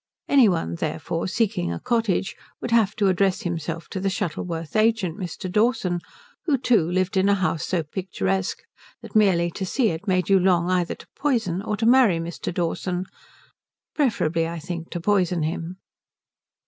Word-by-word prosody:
Any 265 -6 +6
one, 165 - -1
therefore, 85 - -3
seeking 185 - 0
a 85 - -4
cottage 225 -5 0 0.2
would 240 - -5
have 220 -3 +3
to 205 - +2
address 190 0 +2
himself 165 -1 -4
to 190 - -4
the 195 +1 0
Shuttleworth 165 -2 -4
agent, 215 -5 +2
Mr. 180 0 -5
Dawson, 210 -3 +1 0.5
who 295 -5 +2
too 230 -10 +2
lived 185 +2 0
in 190 +1 +3
a 200 - +5
house 185 -5 -1
so 175 -3 0
picturesque 120 - -2 0.4
that - - -11
merely 180 -5 +4
to 190 - -5
see 225 +5 +1
it 165 +5 -5
made 185 -2 +1
you 195 -1 +5
long 180 -1 +2
either 180 -1 0
to - - -15
poison 230 -11 0
or 210 0 -2
to 225 - -1
marry 235 -7 +5
Mr. 165 +1 -4
Dawson 180 +1 -2 0.9
preferably, 165 - +1
I 170 +1 -5
think, 170 +1 -6
to 175 - -4
poison 180 -3 +1
him. 165 +3 -3
185 Hz, 170 wpm, -24 LUFS, 170-210 Hz, 0.9 s, Any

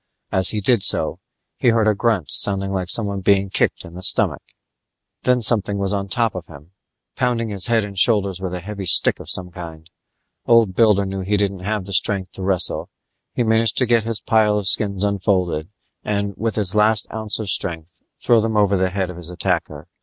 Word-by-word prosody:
As 95 -1 +3
he 105 - 0
did 115 +1 +2
so, - - +2 0.4
he - - -1
heard 115 -2 +3
a 110 - +3
grunt 105 - -1
sounding 95 -1 0
like 95 -2 -3
someone 100 -3 +2
being 100 0 +1
kicked - - -1
in 85 - -13
the 90 - -9
stomach - - +3 0.8
Then 125 -1 +1
something 105 -3 +1
was 100 0 -2
on 100 -1 -3
top 115 +2 0
of 90 -3 -8
him, 75 +2 -15 0.4
pounding 120 -3 -1
his 100 -3 -2
head 115 -2 +1
and 100 -1 -8
shoulders 100 -3 +1
with 95 -2 -4
a 90 - -6
heavy 100 +1 -7
stick - - +5
of - - -9
some 90 -1 -1
kind. 80 -2 -10 0.6
Old 115 -5 +4
Builder 105 -1 +3
knew 95 0 -5
he 100 +3 -1
didn't 100 -2 -2
have 100 +1 -3
the 100 - -4
strength 95 -1 0
to - - -8
wrestle; 95 -1 +1 0.5
he 120 - 0
managed 110 -1 +1
to 130 - +2
get 120 -2 +2
his 115 -1 -3
pile 110 -2 +1
of 105 - -3
skins 100 -1 +3
unfolded 95 -5 -1 0.3
and, 100 -1 -2
with 110 +1 -3
his 100 -4 -1
last 105 0 +3
ounce 110 -1 0
of 105 -4 -3
strength, 80 -1 -3 0.2
throw 115 -2 +3
them 110 0 -2
over 100 -1 +2
the 95 0 0
head 95 -1 -3
of 90 - -12
his 85 -1 -3
attacker. 90 - -3
100 Hz, 205 wpm, -19 LUFS, 95-110 Hz, 0.8 s, stick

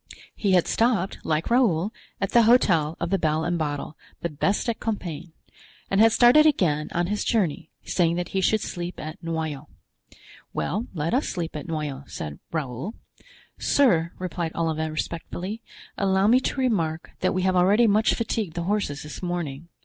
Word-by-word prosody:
He 200 -3 +1
had 180 -2 +4
stopped, 225 -5 +1
like 155 +7 -1
Raoul, 215 -5 +2 0.3
at 195 - -1
the 235 - +6
Hotel 185 -10 +4
of 170 +1 -2
the 195 - +2
Bell 155 0 +1
and 175 0 -1
Bottle, 145 0 -3 0.3
the 170 - -1
best 195 - 0
at 230 -2 -1
Compiegne; 180 -7 -4 0.6
and 195 +2 +4
had 225 0 +7
started 245 +7 +6
again 155 - +1
on 175 +1 0
his 205 +3 -1
journey, 180 -9 0
saying 170 -2 +1
that 175 0 -3
he 190 - -1
should 215 +3 +2
sleep 175 0 -5
at 155 +1 -7
Noyon. 160 -3 -3 0.9
"Well, 215 +6 -2
let 155 +1 -1
us 265 +4 +1
sleep 170 -3 -4
at 150 0 -6
Noyon," 150 -4 -4
said 75 -1 -6
Raoul. 150 - -4 0.6
"Sir," 170 -12 +3
replied 175 -2 -3
Olivain, 160 -1 -1
respectfully, 175 +6 -4 0.4
"allow 190 0 +2
me 240 +4 +6
to 265 - -3
remark 170 -11 0
that 185 - 0
we 185 - 0
have 185 0 +2
already 200 +6 +5
much 215 +1 +3
fatigued 215 -6 -2
the 170 - -2
horses 185 -7 -1
this 150 - -8
morning. 170 -4 -4
175 Hz, 170 wpm, -25 LUFS, 160-210 Hz, 0.9 s, had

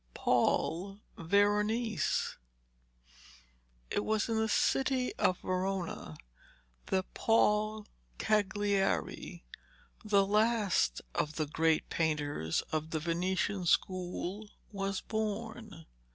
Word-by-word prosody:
PAUL 195 +4 +1 0.2
VERONESE 205 +3 +1 1.5
It 205 - 0
was 215 +1 0
in 225 - +1
the 220 0 +1
city 260 +2 +1
of 180 - +2
Verona 185 - -3 0.7
that 190 -1 -1
Paul 215 -1 +2 0.3
Cagliari, 205 - 0 0.6
the 200 -2 +3
last 210 - +2
of 150 +1 -1
the 155 - 0
great 160 +2 +1
painters 145 - -1
of 155 0 -2
the 160 - -1
Venetian 180 +3 -1
school, 185 +3 -1 0.2
was 195 -1 -2
born. 220 -3 -4
195 Hz, 90 wpm, -32 LUFS, 170-215 Hz, 1.5 s, the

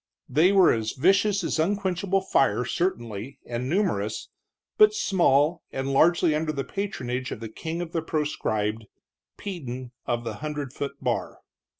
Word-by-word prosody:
They 155 +8 +4
were 195 -3 +6
as 110 -1 -2
vicious 195 +6 +3
as 165 - -1
unquenchable 195 +1 +1
fire, 135 -9 +2
certainly, 120 - -2
and 120 +2 -3
numerous, 150 - 0 0.5
but 425 0 +7
small, 165 - +3
and 135 +1 -2
largely 170 +3 +4
under 155 +1 0
the 140 -2 -3
patronage 130 - -3
of - - -5
the 115 -1 -6
king 165 +9 -4
of 165 - -8
the 165 - -1
proscribed, 110 -9 -2 0.5
Peden 130 -10 -6 0.2
of 120 0 -1
the 110 -3 -5
hundred 150 -3 -4
foot 140 0 -4
bar. 125 -2 -2
150 Hz, 150 wpm, -26 LUFS, 125-180 Hz, 0.5 s, but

